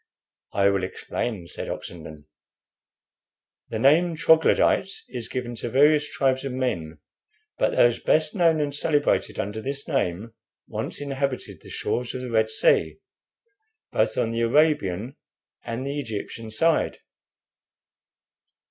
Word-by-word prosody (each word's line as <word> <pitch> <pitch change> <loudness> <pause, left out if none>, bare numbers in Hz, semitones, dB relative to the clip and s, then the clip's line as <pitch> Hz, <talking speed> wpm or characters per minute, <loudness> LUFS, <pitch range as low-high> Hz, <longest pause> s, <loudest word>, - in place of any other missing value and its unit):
"I 100 0 +4
will 100 -1 0
explain," 95 +1 -4
said - - -6
Oxenden. 80 -3 -8 1.4
"The - - -3
name 165 +5 +4
Troglodytes 160 +4 +3
is 120 -3 -6
given 125 -2 -4
to 120 - -4
various 150 +3 +4
tribes 130 0 +1
of 135 -2 -4
men, 85 -12 -2 0.6
but - - +1
those 120 -1 +4
best 155 0 +2
known 165 -4 +3
and 145 -1 -1
celebrated 145 0 +1
under 105 +2 -3
this 140 +3 -4
name 115 - -1 0.3
once - - -4
inhabited 140 -2 -3
the - - -13
shores 125 0 -2
of 130 - -4
the 125 -1 -6
Red 110 -1 +2
Sea, - - +2 0.9
both - - +1
on 115 - +1
the 115 0 -1
Arabian 120 - +1 0.5
and 115 +3 -4
the 140 +1 -3
Egyptian 115 -2 -5
side. 160 +9 +1
130 Hz, 130 wpm, -25 LUFS, 110-145 Hz, 1.4 s, I